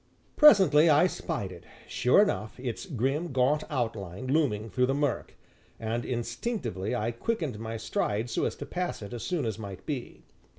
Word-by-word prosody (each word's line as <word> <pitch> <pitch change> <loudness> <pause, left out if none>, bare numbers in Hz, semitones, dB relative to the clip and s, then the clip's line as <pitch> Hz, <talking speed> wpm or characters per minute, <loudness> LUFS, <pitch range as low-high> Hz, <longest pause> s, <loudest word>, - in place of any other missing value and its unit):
Presently 185 - +7
I 150 +3 +6
spied 155 - -3
it, 85 -1 -11 0.2
sure 130 +11 +4
enough, 110 - -3
its 125 - -4
grim, 145 - -1
gaunt 130 +4 +2
outline 115 - -3
looming 130 -7 +1
through 125 +6 +2
the 135 - +1
murk, 145 -3 -1 0.4
and 115 +1 -2
instinctively 120 - -3
I 115 0 -1
quickened 145 - -2
my 115 0 -4
stride 110 0 -1
so 115 - -1
as - - -2
to - - -7
pass 180 -10 -3
it 100 - -8
as 120 - -5
soon 175 -7 -1
as 110 -1 -3
might 100 -3 -8
be. 140 -6 -5
125 Hz, 170 wpm, -28 LUFS, 110-155 Hz, 0.4 s, Presently